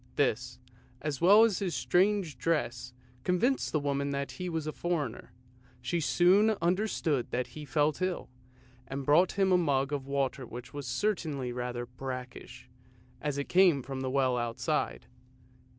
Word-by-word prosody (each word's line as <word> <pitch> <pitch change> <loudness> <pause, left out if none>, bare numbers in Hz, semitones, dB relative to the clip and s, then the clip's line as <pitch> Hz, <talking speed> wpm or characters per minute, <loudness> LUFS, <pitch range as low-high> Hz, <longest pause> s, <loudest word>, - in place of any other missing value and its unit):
This, 125 -3 0 0.4
as 150 -1 -4
well 200 +6 +8
as 220 -5 +2
his 180 -6 -2
strange 185 -6 +1
dress, 125 -6 -1 0.3
convinced 235 +10 +1
the 155 - +1
woman 140 0 -1
that 140 0 -3
he 180 -1 -5
was 160 -2 -3
a 155 - -2
foreigner. 155 -9 -3 0.5
She 130 +8 -1
soon 190 +7 +4
understood 170 - 0
that 125 0 -1
he 150 -1 -7
felt 145 +4 +1
ill, 185 -1 -1 0.6
and 135 +1 -5
brought 160 +6 +4
him 195 -1 +2
a 180 - +5
mug 140 -3 +1
of 140 -2 -3
water 140 -1 -1
which 120 +2 -9
was 145 -3 -6
certainly 140 -3 -1
rather 120 0 -4
brackish, 125 0 -8 0.5
as 145 -2 -2
it 140 - -3
came 175 -7 +4
from 135 +1 -5
the 130 - -2
well 130 -2 +2
outside. 120 +6 -2
145 Hz, 155 wpm, -30 LUFS, 130-175 Hz, 0.6 s, well